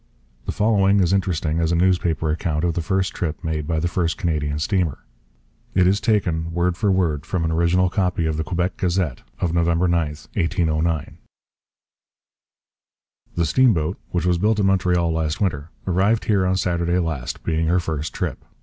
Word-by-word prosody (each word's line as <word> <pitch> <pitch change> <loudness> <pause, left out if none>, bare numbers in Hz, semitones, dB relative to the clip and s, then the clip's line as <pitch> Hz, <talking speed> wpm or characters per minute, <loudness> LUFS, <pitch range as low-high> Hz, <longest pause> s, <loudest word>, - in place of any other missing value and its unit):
The - - 0
following 100 -2 +3
is 90 -1 +2
interesting 85 -4 0
as 80 0 +1
a - - +2
newspaper 85 -3 +1
account 75 0 -1
of 85 -1 +1
the 85 - -2
first 95 +3 -1
trip 80 -3 -4
made 80 -2 -2
by 80 -1 0
the 85 - 0
first 85 -1 -1
Canadian 75 -6 -1
steamer. 85 -3 0 0.8
It 90 -1 +4
is 100 +3 +2
taken, 85 -7 0
word 85 +1 0
for 100 +1 +1
word, 85 -6 +1
from 85 -1 -2
an 80 - 0
original 85 +3 +2
copy 90 -3 0
of 80 -1 0
the 80 - -1
Quebec 90 +2 -2
Gazette 90 -8 -1 0.2
of 85 -2 -1
November 85 +1 +2
9, 85 -3 +2 0.3
1809. 80 -2 -1 2.2
The 85 - +1
Steam 120 +7 +4
Boat, 80 +3 -2
which 85 -1 -1
was 90 -1 +2
built 105 +3 +2
at 100 - +2
Montreal 90 -3 +2
last 80 -1 -1
winter, 80 -6 -1 0.2
arrived 95 +5 +1
here 100 -4 +2
on 95 0 +1
Saturday 85 -1 0
last, 80 -8 -3
being 80 0 0
her 90 +3 +3
first 80 -3 -3
trip. - - -4
85 Hz, 175 wpm, -22 LUFS, 80-95 Hz, 2.2 s, It